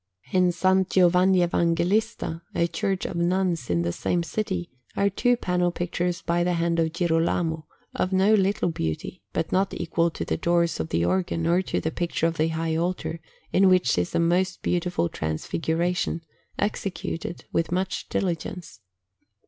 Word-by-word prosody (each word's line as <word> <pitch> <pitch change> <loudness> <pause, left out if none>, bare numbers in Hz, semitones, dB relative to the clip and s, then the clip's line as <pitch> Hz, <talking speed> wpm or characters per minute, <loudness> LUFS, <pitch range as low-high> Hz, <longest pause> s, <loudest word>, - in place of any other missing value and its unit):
In 185 -1 +4
S. 175 +1 -2 0.2
Giovanni 180 0 +4
Evangelista, 170 +2 0
a 170 - +3
church 190 +2 -2
of - - -4
nuns 175 -4 0
in 85 -1 +1
the 85 - 0
same 170 - -1
city, 185 -2 -3 0.2
are 200 0 +2
two 245 +5 +2
panel 180 -4 0
pictures 175 0 -2
by 170 +1 +1
the 180 0 +1
hand 170 0 +1
of 160 -1 +1
Girolamo, 165 -1 0 0.3
of 185 - -1
no 190 +3 +4
little 195 -3 +2
beauty, 80 - -4
but - - -2
not 195 +1 +1
equal 170 0 0
to - - -5
the - - -1
doors 170 -1 +1
of 80 - -3
the 85 +1 +1
organ 170 - 0
or 170 +2 +3
to 190 - -2
the 160 - -2
picture 170 -1 -1
of 165 0 0
the 155 - +2
high 160 0 -1
altar, 170 0 -2 0.3
in 190 0 +5
which 185 -1 +4
is 90 0 -1
a - - +3
most 180 +2 +1
beautiful 175 - 0
Transfiguration, 165 - -1 0.4
executed 195 -4 -3
with 165 - 0
much 185 0 -2
diligence. 170 - -3
175 Hz, 165 wpm, -25 LUFS, 165-185 Hz, 0.4 s, in